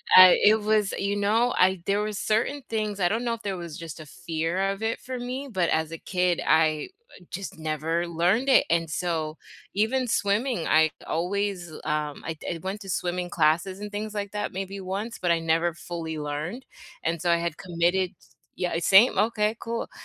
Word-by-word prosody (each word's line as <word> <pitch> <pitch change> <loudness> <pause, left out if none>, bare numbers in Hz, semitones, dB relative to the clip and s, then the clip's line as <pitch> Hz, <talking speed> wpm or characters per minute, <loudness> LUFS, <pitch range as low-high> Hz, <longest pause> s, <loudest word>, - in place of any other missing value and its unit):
I 185 -1 +10
it 215 +1 +6
was 210 -1 +2
you 200 +1 -1
know, 220 +4 +2
I 185 -1 +3
there 200 +1 +1
were 215 0 -2
certain 225 +8 0
things 215 -2 -2
I 180 - +3
don't 230 +3 -1
know 235 -1 0
if 230 - -6
there 195 -2 -2
was 170 -3 -7
just 165 -2 -8
a 155 - -9
fear 165 +5 -2
of 195 - -6
it, 225 +1 -1
for 255 0 -6
me, 255 +3 -4
but 180 -4 +1
as 160 0 0
a 165 - -5
kid, 180 -1 0
I 155 -1 +3 0.4
just 195 -2 -6
never 160 +2 -1
learned 180 +10 +1
it, 265 - +6
and 165 -1 +1
so, 160 -2 -2 0.4
even 245 +5 +1
swimming, 215 0 0
I 160 0 +4
always, 180 0 -2
um, 150 -1 -2
I 160 -2 -4
I 165 - -4
went 195 +2 -4
to 195 - -9
swimming 180 0 -2
classes 170 +4 +1
and 210 0 -6
things 210 +1 -4
like 200 -1 -4
that 210 -1 -3
maybe 195 +1 -5
once, 195 +5 -4
but 175 - +1
I 170 - +3
never 165 +1 +1
fully 165 -2 -6
learned, 150 - -4 0.4
and 165 0 -1
so, 175 - 0
I 170 - +4
had 170 -2 -3
committed 180 0 0
t - - -22 0.3
yeah, 180 -2 -1
same, 195 +6 +6
okay, 215 +1 +2
cool 230 0 -4
185 Hz, 200 wpm, -26 LUFS, 165-210 Hz, 0.4 s, I